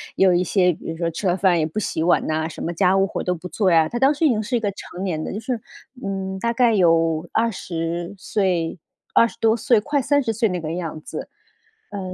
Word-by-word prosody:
有 190 -1 +4
一 175 +1 +2
些， 180 -1 +2
比 165 - -7
如 165 - -7
说 170 0 -1
吃 185 +4 -3
了 180 +1 +2
饭 185 -2 +3
也 155 - +1
不 160 +7 -3
洗 160 -5 -2
碗 175 0 +3
呐， 155 0 0
什 - - -9
么 170 - -2
家 185 +2 +3
务 195 0 +3
活 - - -4
都 180 - 0
不 175 +2 -8
做 185 +2 +1
呀， 160 -1 +5
她 240 - -3
当 270 +3 +4
时 305 +3 0
已 - - +5
经 220 -4 +1
是 240 - -2
一 - - 0
个 205 -2 -1
成 185 -1 -9
年 155 -4 -2
的， - - -4
就 210 - -3
是， 235 0 -3 0.4
嗯， 190 -1 -3
大 235 +4 0
概 235 -1 +3
有 165 -3 +3
20 175 -5 -2
岁， 180 -4 -1 0.3
20 230 - +3
多 225 0 +3
岁 235 -2 +3
快 285 +6 0
30 270 -4 +1
岁 225 -1 +1
那 180 - -2
个 160 -1 -4
样 165 -3 -4
子。 - - -7 0.6
呃， 200 - -5
190 Hz, 245 characters per minute, -22 LUFS, 170-220 Hz, 0.6 s, 呀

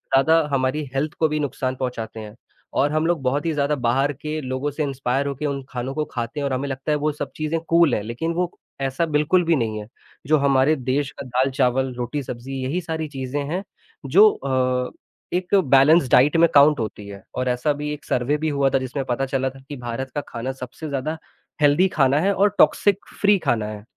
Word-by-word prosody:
ज़्यादा 160 +5 +5
हमारी 135 +3 0
हेल्थ 150 +3 -1
को 160 - +4
भी 150 0 -1
नुकसान 130 -3 -2
पहुँचाते 115 -4 -4
हैं 105 0 -9 0.4
और 145 +1 +2
हम 155 +1 +1
लोग 170 -4 0
बहुत 140 +4 0
ही 165 - 0
ज़्यादा 145 0 +1
बाहर 135 +4 +2
के 150 +3 -5
लोगों 130 +2 -3
से 150 +2 -2
इंस्पायर 135 0 -1
होके 140 +2 -4
उन 140 -2 -2
खानों 130 +1 -4
को 155 -1 -1
खाते 120 +4 -4
हैं 140 - -1
और 140 - -1
हमें 135 +2 -2
लगता 135 +3 -3
है 150 - +2
वो 150 +1 0
सब 145 -1 -6
चीज़ें 155 +1 -1
कूल 165 -5 +4
हैं 105 - -2
लेकिन 120 +10 -3
वो 180 0 -1 0.3
ऐसा 135 +5 0
बिल्कुल 155 +4 +2
भी 165 0 +3
नहीं 110 -4 -1
है, 105 - -8 0.4
जो 155 0 +4
हमारे 140 +1 +3
देश 135 +1 -1
का 140 - -5
दाल-चावल, 130 0 +1
रोटी-सब्ज़ी 125 0 -5
यही 155 +8 -1
सारी 160 -1 -4
चीज़ें 140 0 -4
हैं, 185 +3 -2 0.4
जो 200 +11 +7
अ, 130 -2 -1 0.4
एक 180 +2 +1
बैलेंस 145 -2 +5
डाइट 145 +5 +5
में 170 - +6
काउंट 145 0 +6
होती 105 -2 -5
है 100 0 -10
और 130 - -1
ऐसा 125 +4 0
अभी 150 0 -1
एक 150 - -9
सर्वे 125 +4 0
भी 155 +1 -1
हुआ 140 -1 +2
था 135 - +2
जिसमें 130 +2 -3
पता 130 +2 -1
चला 130 0 -1
था 135 +1 -14
कि 145 - -5
भारत 125 +2 -5
का 145 - 0
खाना 120 +2 -4
सबसे 130 +4 -8
ज़्यादा 145 +3 -2 0.4
हेल्दी 150 +6 +5
खाना 140 -1 +3
है 195 +5 +2
और 200 +2 +3
टॉक्सिक 205 -1 +4 0.2
फ्री 205 -1 +5
खाना 115 -5 +1
है। 105 -1 -7
140 Hz, 215 wpm, -22 LUFS, 130-155 Hz, 0.4 s, जो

